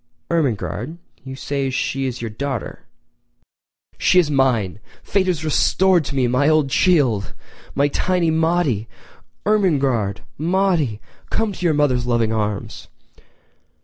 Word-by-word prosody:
"Ermengarde—you 135 - -3
say 135 0 -2
she 135 +1 -1
is 125 -2 -5
your 115 -2 -4
daughter.... 135 +2 -5 1.1
She 185 - +3
is 165 -5 +4
mine! 120 -9 +1 0.2
Fate 190 -2 0
has 165 -4 -1
restored 180 +3 +3
to 140 - -5
me 130 -2 +2
my 125 +5 +2
old 155 -3 +2
chee 180 +4 +4
ild—my 125 +3 -2
tiny 180 +1 +1
Maudie! 160 - +1 0.6
Ermengarde—Maude—come 160 - 0
to 185 - -8
your 165 -3 +2
mother's 130 -5 +1
loving 115 -2 +1
arms!!!" 105 -2 -3
140 Hz, 115 wpm, -20 LUFS, 120-170 Hz, 1.1 s, is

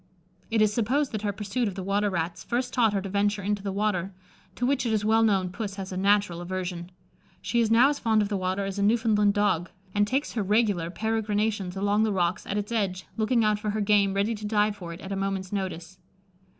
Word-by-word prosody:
It 220 -1 +3
is 210 -1 +2
supposed 255 +6 +1
that 215 - -3
her 210 -1 -1
pursuit 210 +4 -2
of 195 - -4
the 190 - -5
water 200 +2 +1
rats 170 -2 -3
first 245 +1 -2
taught 225 -4 +3
her 195 -2 -1
to - - -4
venture 205 +1 0
into 205 +1 -1
the 200 0 -3
water, 195 -2 -1 0.4
to 245 - -1
which 270 -1 +1
it 235 - -1
is 210 -1 0
well 220 +1 +4
known 195 -5 +2
Puss 200 0 -5
has 195 -1 -6
a - - -4
natural 195 -2 +2
aversion. 180 -1 -4 0.5
She 235 - -1
is 230 -2 +2
now 235 +4 +6
as 290 - -2
fond 220 -2 +2
of - - -2
the 205 - -2
water 190 +1 -1
as 195 +1 -4
a - - 0
Newfoundland 210 -1 +3
dog, 205 -4 +1 0.2
and 205 0 +2
takes 270 +6 -1
her 225 - -2
regular 200 -4 +1
peregrinations 210 -2 -1
along 205 +2 +2
the 220 -1 +2
rocks 180 0 0
at 205 - -2
its 205 +2 -3
edge, 195 -5 -1
looking 225 +1 +2
out 210 -1 +2
for 210 - -3
her 215 +1 -1
game 200 -1 +3
ready 200 +3 +1
to 210 -1 -6
dive 210 -1 +2
for 175 -4 -8
it 170 - -9
at 195 - -8
a - - -1
moment's 195 0 -3
notice." 185 -2 -4
205 Hz, 240 wpm, -26 LUFS, 190-220 Hz, 0.5 s, now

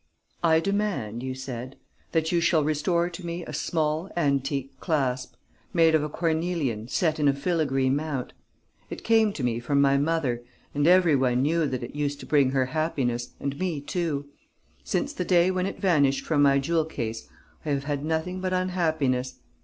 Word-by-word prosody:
"'I 160 -1 +4
demand,' 195 - -1
you 130 0 -4
said, 130 0 -6 0.4
'that 160 -1 +1
you 170 -1 +2
shall 165 -2 +3
restore 165 +3 +1
to 180 +1 -8
me 170 0 -4
a 155 - -8
small, 155 +3 -1
antique 140 -3 0
clasp, 130 -6 -1 0.4
made 165 -1 +5
of 160 - +4
a 150 - -3
cornelian 160 -9 -1
set 155 +3 0
in 145 - +3
a 140 - +4
filigree 140 -4 0
mount. 140 -1 -2 0.6
It - - -7
came 220 -2 +4
to 140 - -5
me 120 -1 0
from 140 +4 0
my 140 0 +4
mother; 145 -6 0 0.3
and 145 +1 +1
every 175 -3 +5
one 130 -1 +2
knew 160 +1 +2
that 130 -2 -3
it - - -7
used 145 -1 -2
to - - -8
bring 140 -3 +3
her 130 -1 +1
happiness 125 -7 -1
and 140 +1 -4
me 180 -5 -1
too. 145 -1 -2 0.6
Since 290 0 -1
the 180 - -2
day 180 0 +4
when 185 0 -1
it - - -6
vanished 145 -8 +2
from 150 -3 +2
my 140 -1 +5
jewel 160 +3 +1
case, 115 -7 -5 0.3
I 155 - -4
have 140 -1 0
had 145 0 -2
nothing 160 +4 -2
but 185 0 -1
unhappiness. 155 -9 0
150 Hz, 185 wpm, -26 LUFS, 135-170 Hz, 0.6 s, made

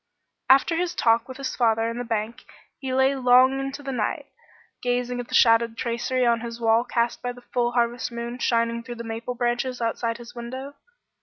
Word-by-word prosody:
After 275 +5 +5
his 355 0 -1
talk 230 -3 +2
with 260 -1 -9
his 275 -1 -4
father 225 -2 +2
in 230 +1 -4
the - - -2
bank 230 +1 -3 0.4
he 265 -2 -4
lay 265 +1 +3
long 255 +1 +5
into 275 +1 -5
the 270 - -4
night, 225 -5 -2 0.6
gazing 245 0 -1
at 245 - -5
the - - -3
shadowed 230 0 +4
tracery 240 +2 -1
on 235 -1 +3
his 235 0 -6
wall 225 0 +3
cast 240 -1 -1
by 245 - -2
the 245 0 -13
full 240 -1 +1
harvest 240 0 0
moon 235 +1 -5
shining 235 -1 +1
through 240 0 -8
the 235 - -7
maple 230 +2 -5
branches 245 +1 -1
outside 230 0 -1
his 240 0 -11
window. 260 +4 -7
240 Hz, 200 wpm, -24 LUFS, 235-255 Hz, 0.6 s, After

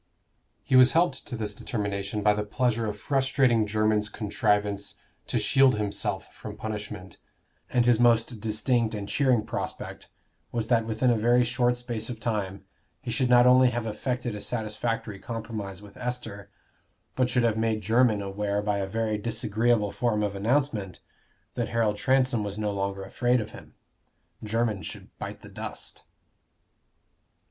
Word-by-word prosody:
He - - +1
was 130 0 +8
helped 165 -5 +2
to 120 - -4
this 105 -2 -3
determination 100 -1 -3
by 105 0 +5
the 105 0 -2
pleasure 115 +1 0
of 105 0 -4
frustrating 130 -5 +2
Jermyn's 110 0 +1
contrivance 105 -1 0 0.3
to - - 0
shield 130 +4 +4
himself 105 -1 -2
from - - -9
punishment, 105 -3 -6 0.5
and 120 -2 +2
his 120 -2 +4
most 115 -1 +3
distinct 110 +1 0
and 100 -1 -5
cheering 125 -3 +2
prospect 100 -5 -5 0.4
was 115 -2 -2
that 115 -2 +3
within 115 +3 +2
a - - +3
very 120 +2 +4
short 120 0 +1
space 120 -2 -5
of 120 -3 -5
time 100 -4 -3 0.3
he 125 -3 -5
should 130 0 +1
not 120 0 +7
only 125 0 +6
have 120 -1 -3
effected 120 +2 -3
a 105 - -6
satisfactory 110 -2 -3
compromise 105 -4 -6
with 100 - -14
Esther, 115 -5 -5 0.7
but 130 -1 +2
should 125 -1 +2
have 115 -2 +2
made 110 -1 0
Jermyn 115 -2 +3
aware 100 +1 -2
by 105 -1 0
a 95 - -2
very 110 +1 -1
disagreeable 110 0 +1
form 110 -3 0
of 100 -1 -2
announcement, 110 - 0 0.5
that - - -2
Harold 110 -3 +1
Transome 130 -2 +2
was 100 0 -4
no 105 -1 -1
longer 100 0 -3
afraid 120 +5 +1
of 110 - -5
him. - - -13 0.7
Jermyn 110 -2 0
should - - -8
bite - - -7
the - - -10
dust. - - -7
110 Hz, 155 wpm, -27 LUFS, 105-120 Hz, 0.7 s, was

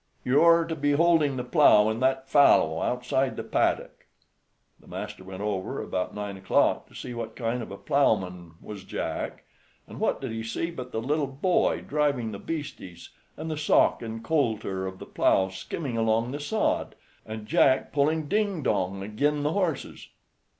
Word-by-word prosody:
"You 130 +3 +4
are 170 0 +6
to 165 -1 -3
be 145 -1 +1
holding 155 -3 +3
the 125 - -2
plow 125 -6 +5
in 110 +1 -1
that 130 +1 +1
fallow, 130 - +4
outside 125 +2 0
the - - -5
paddock." - - -1 0.7
The - - -21
master - - -7
went 95 +1 -7
over 100 -3 -2
about 90 -1 -3
nine 105 -1 -5
o'clock 95 - +1
to - - -19
see 125 - -6
what 115 -1 -6
kind 120 0 -2
of 115 - -7
a 100 - -7
plowman 90 - 0
was 105 -2 -8
Jack, - - -4 0.4
and - - -10
what - - 0
did 130 -4 -5
he 115 0 -4
see 115 +9 -3
but 125 -6 -8
the 110 - -3
little 145 +2 0
boy 140 +7 +1
driving 140 -6 0
the 100 - -7
bastes, 145 - -7 0.3
and 160 - -5
the 155 - -3
sock 150 - +3
and 115 -1 -6
coulter 110 -10 -1
of 95 0 -7
the - - -9
plow 95 0 +2
skimming 115 - -5
along 115 +2 +1
the 145 - -4
sod, 215 +9 -1 0.3
and 110 -1 -7
Jack 130 +4 +3
pulling 150 +2 +1
ding 200 -4 0
dong 95 -2 -1
agin' 145 +8 0
the 150 +2 0
horses. 175 -8 -2
125 Hz, 180 wpm, -27 LUFS, 105-150 Hz, 0.7 s, are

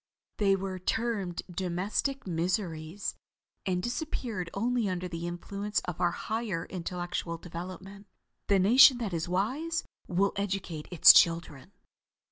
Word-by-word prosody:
They 195 -2 +3
were 190 -1 -4
termed 200 -3 -2
"domestic 190 +9 -2
miseries," 175 0 -2 0.5
and 180 -1 0
disappeared 240 - -3
only 235 +1 0
under 180 0 -3
the 170 -1 -5
influence 200 +4 -3
of 180 - -6
our 175 - +4
higher 215 -1 -3
intellectual 175 -1 -4
development. 185 +4 -9 0.4
The 200 - +4
nation 245 +7 +7
that 220 -6 -3
is 165 0 -2
wise 265 - -1 0.2
will 195 +2 +1
educate 190 -6 -3
its 175 -4 +9
children." 165 -2 +2
185 Hz, 120 wpm, -29 LUFS, 175-210 Hz, 0.5 s, its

